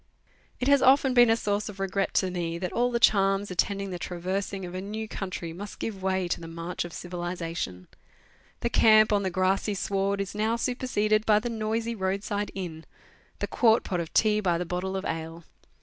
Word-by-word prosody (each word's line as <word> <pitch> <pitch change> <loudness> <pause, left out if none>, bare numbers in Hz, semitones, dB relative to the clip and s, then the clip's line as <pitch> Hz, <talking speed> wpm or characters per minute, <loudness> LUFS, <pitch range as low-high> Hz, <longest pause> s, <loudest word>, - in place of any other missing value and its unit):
It 250 - -1
has 280 -1 +5
often 265 0 +5
been 240 -1 +6
a 225 - +4
source 205 -1 -1
of 200 -1 -10
regret 195 0 -1
to 185 -1 +2
me 170 -2 -3
that 180 0 -4
all 245 +1 +2
the 240 -1 0
charms 195 -2 +3
attending 195 +2 -1
the 180 - -5
traversing 190 +2 -3
of 175 - -8
a 185 - -4
new 215 +3 -5
country 185 -5 -5
must 200 +4 -8
give 200 -4 -5
way 190 -1 0
to - - -2
the 165 - -7
march 170 +2 -4
of 175 - -8
civilization; 170 - -5 0.7
the 235 - 0
camp 215 -1 +6
on 205 - +3
the 190 - -1
grassy 190 +3 +1
sward 195 +1 -1
is 195 -1 -3
now 215 +2 0
superseded 220 -3 0
by 210 -1 +6
the 235 +3 -1
noisy 225 +1 -2
road 195 -1 -2
side 205 0 -2
inn; 170 -4 -5 0.5
the - - -2
quart 225 -2 +3
pot 180 - -2
of 165 -2 -4
tea 215 -1 +3
by 180 -5 +1
the 180 - -3
bottle 180 +2 -3
of 190 - -5
ale. 165 +1 -4
195 Hz, 205 wpm, -27 LUFS, 180-215 Hz, 0.7 s, been